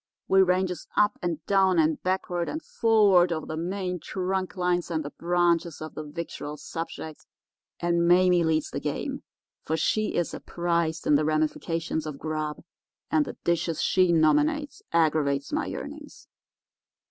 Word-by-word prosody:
We 190 0 +5
ranges 180 -1 +1
up 210 0 +3
and 165 -3 -3
down 190 -2 +3
and 160 -1 +2
backward 180 -2 -1
and 310 - -3
forward 205 -6 +4
over 155 -2 -2
the 155 - -5
main 180 +2 -3
trunk 185 +2 -3
lines 180 -1 0
and 160 -3 -2
the 145 - -5
branches 170 -1 +1
of 155 0 -7
the - - -5
victual 150 -1 -6
subject, 160 -1 -7 0.5
and 170 0 +1
Mame 180 -1 +5
leads 155 -1 0
the - - -3
game, - - -3 0.4
for 160 - -1
she 215 +7 0
is 175 - -1
apprised 170 -2 -1
in - - +3
the 145 +1 +4
ramifications 155 +1 -1
of 150 -2 -5
grub, 155 -1 -4 0.5
and 155 -2 +3
the - - -8
dishes 170 -1 0
she 185 -2 +3
nominates 295 - +2
aggravates 150 - +1
my 300 -2 0
yearnings. 295 +11 -8
170 Hz, 150 wpm, -26 LUFS, 155-185 Hz, 0.5 s, We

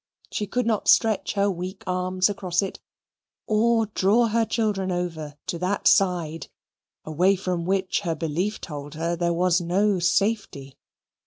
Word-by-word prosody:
She 210 - -2
could 250 +2 -1
not 220 -3 0
stretch 220 -3 +3
her 200 0 +1
weak 185 +2 -6
arms 185 0 +1
across 190 -2 -1
it, 195 - -5 0.7
or 225 +1 +2
draw 210 +3 +2
her 230 +1 +2
children 210 -4 -1
over 165 -4 -4
to 170 - -4
that 185 +3 0
side 175 -4 +2 0.6
away 180 +6 +2
from 180 -2 -3
which 190 -1 0
her 170 -5 -2
belief 170 +7 -2
told 145 -2 -8
her 165 +2 -1
there 170 0 0
was 175 +1 +2
no 190 +3 +1
safety. 175 -7 -1
185 Hz, 150 wpm, -24 LUFS, 170-205 Hz, 0.7 s, stretch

